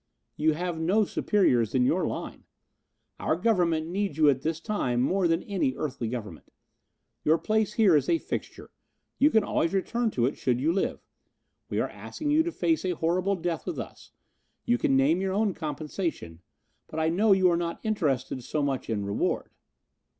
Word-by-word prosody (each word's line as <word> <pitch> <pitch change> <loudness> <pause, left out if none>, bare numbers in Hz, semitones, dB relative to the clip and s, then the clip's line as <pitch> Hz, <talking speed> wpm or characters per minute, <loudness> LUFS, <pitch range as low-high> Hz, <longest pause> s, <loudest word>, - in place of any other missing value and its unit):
"You 155 +1 +2
have 175 +1 -3
no 195 +7 +2
superiors 130 - +1
in 125 -1 +3
your 165 +5 +1
line. - - -6 0.7
Our 155 - +1
Government 175 -5 +1
needs 185 -2 -2
you 155 -2 +5
at 130 -1 -3
this 160 +2 -2
time 165 - -1
more 180 +8 +2
than 165 +1 +1
any 180 -10 -1
earthly 135 -5 -3
government. 105 -9 -7 0.7
Your 155 +2 +4
place 215 +2 0
here 210 -7 +5
is 145 - +2
a 335 - +4
fixture. - - -6 0.5
You 290 - +6
can 220 -8 +3
always 170 -2 0
return 235 +5 0
to 120 - 0
it, 135 - -1
should 125 -2 0
you 155 +5 +1
live. 195 - -2 0.6
We - - -1
are - - +1
asking 295 -1 -5
you 305 +2 +5
to 345 +1 -2
face 325 -1 0
a 180 -2 -1
horrible 180 +5 +1
death 170 -2 -3
with - - -3
us. - - -8 0.5
You 120 - +2
can 135 - +2
name 150 +7 +3
your 190 -1 -1
own 205 -1 +1
compensation, 155 - -4 0.5
but 155 - -5
I 160 0 +2
know 200 +6 +2
you 185 -2 +5
are - - +2
not 170 0 -3
interested 135 - -1
so 150 +4 -2
much 135 -4 -2
in 105 -3 -1
reward. 100 +1 -1
165 Hz, 185 wpm, -27 LUFS, 140-195 Hz, 0.7 s, You